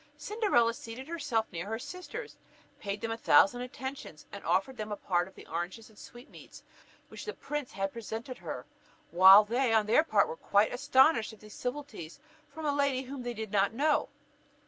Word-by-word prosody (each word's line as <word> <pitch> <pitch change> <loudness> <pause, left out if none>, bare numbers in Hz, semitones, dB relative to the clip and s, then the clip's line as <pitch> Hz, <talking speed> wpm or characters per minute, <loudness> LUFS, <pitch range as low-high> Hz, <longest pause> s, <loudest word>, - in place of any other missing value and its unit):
Cinderella 400 - +1
seated 235 +4 -9
herself 285 -9 -1
near 175 +1 -5
her 225 +1 -2
sisters, 365 - -8 0.4
paid 200 0 -4
them 230 0 -3
a 225 - -3
thousand 285 -2 +5
attentions, 250 - -7
and 200 - -9
offered 195 +8 0
them 215 -2 -6
a - - -1
part 175 -3 0
of 190 - -17
the - - -13
oranges 175 +7 -5
and 215 - -19
sweetmeats 240 +4 -13 0.4
with - - -34
which - - -8
the 430 - -5
prince 295 -3 -5
had 195 0 -3
presented 230 +3 -6
her, - - -6 0.5
while 190 +4 +9
they 240 +3 0
on 220 -1 +3
their 225 +8 +5
part - - +3
were 475 - -5
quite 210 - +2
astonished 260 -2 +3
at 220 - -15
these 210 -1 -13
civilities 250 - -6 0.3
from 320 -1 -8
a 290 - +1
lady 280 -2 +1
whom 270 0 -7
they 240 -1 -5
did 220 -2 -6
not 200 +1 +2
know. 295 +3 +1
235 Hz, 190 wpm, -30 LUFS, 210-280 Hz, 0.5 s, while